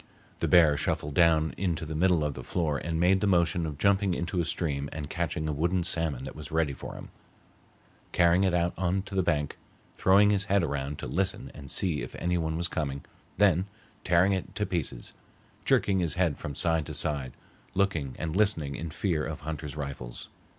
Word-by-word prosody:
The - - 0
bear 80 -5 +6
shuffled 75 0 -1
down 80 -1 +4
into 85 -4 -1
the 80 - -5
middle 85 0 +3
of 75 -1 -1
the - - -8
floor 75 -5 -1
and 80 0 -2
made 95 +3 +4
the 105 - +2
motion 85 -2 +2
of 75 -2 -6
jumping 100 0 +2
into 85 +2 -2
a 85 - +1
stream 70 -4 -2
and 75 -2 -5
catching 80 -1 -2
a 75 - -1
wooden 85 +5 +1
salmon 80 -6 0
that 65 - -7
was - - -8
ready 80 -3 +1
for - - -8
him, - - -9 1.0
carrying 85 +2 +4
it 95 -2 +2
out 85 0 +1
on 95 +1 0
to 100 - -10
the 95 - +2
bank, 75 -5 -1 0.4
throwing 100 +2 +5
his 100 -2 +1
head 100 -2 +2
around 70 -1 -2
to - - -6
listen 95 +2 -2
and 70 -2 -10
see 85 -4 0
if - - -7
any 90 +1 -1
one 80 -1 -1
was 85 +1 0
coming, 70 -4 -3 0.3
then 95 -1 +4 0.4
tearing 90 +3 +4
it 95 - -4
to 105 - 0
pieces, 80 -10 -2 0.5
jerking 95 -2 +3
his 85 -4 +1
head 90 -5 +1
from 70 - -6
side 80 -1 +1
to 75 - -5
side, 70 -3 -1 0.4
looking 85 -9 0
and 80 0 -3
listening 95 -9 +1
in 80 +4 -5
fear 80 0 -1
of 75 -1 -5
hunters' 75 -1 -5
rifles. 70 -5 -6
85 Hz, 200 wpm, -28 LUFS, 75-90 Hz, 1.0 s, bear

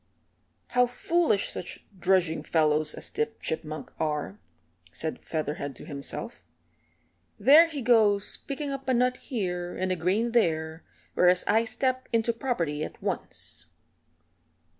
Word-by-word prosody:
"How 250 0 +4
foolish 310 - +1
such - - -6
drudging 180 -4 +2
fellows 155 -1 +2
as - - -5
Tip 225 0 -2
Chipmunk 155 -3 -5
are!" 150 -10 -2 0.5
said 160 -1 -4
Featherhead 145 -3 -3
to - - -10
himself. 140 -3 -5 1.0
"There 290 +10 +8
he 295 -5 -5
goes 215 -4 +3
picking 285 0 -3
up 270 -1 -5
a 255 - +3
nut 250 +1 +2
here 180 -8 -3
and 185 0 -1
a - - +2
grain 195 +8 0
there, 160 -7 +1 0.3
whereas 180 0 +4
I 220 +2 +3
step 255 +2 -1
into 230 0 +2
property 170 - -2
at - - -7
once." - - -4
190 Hz, 130 wpm, -27 LUFS, 160-245 Hz, 1.0 s, There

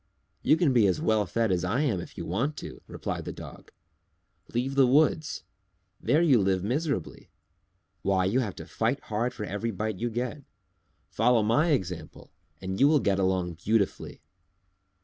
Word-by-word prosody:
"You 155 - +4
can 165 -7 +2
be 115 -5 +5
as 90 - +1
well 110 -3 +1
fed 115 +3 0
as 90 -1 0
I 110 +10 0
am 120 -12 +1
if - - -11
you - - -5
want 125 - -1
to," - - -8
replied - - -4
the - - -4
Dog. - - -11 0.8
"Leave 125 +3 -1
the 135 -2 +5
woods; 155 +3 +2 0.6
there 155 +4 +3
you 135 -10 +5
live 95 -1 +1
miserably. 140 - -2 0.7
Why, 95 -1 +1
you 105 +7 +2
have 110 -7 -2
to - - -8
fight 120 +5 -1
hard 115 +3 -2
for 105 - -6
every 105 +3 -3
bite 110 -1 -3
you 120 - -1
get. 125 +5 -3 0.7
Follow 125 -3 +3
my 115 +10 +3
example 90 - -3 0.3
and 95 0 -4
you 140 - +6
will 150 0 +4
get 100 -5 +1
along 95 -2 0
beautifully." 105 -2 -1
110 Hz, 170 wpm, -27 LUFS, 95-135 Hz, 0.8 s, you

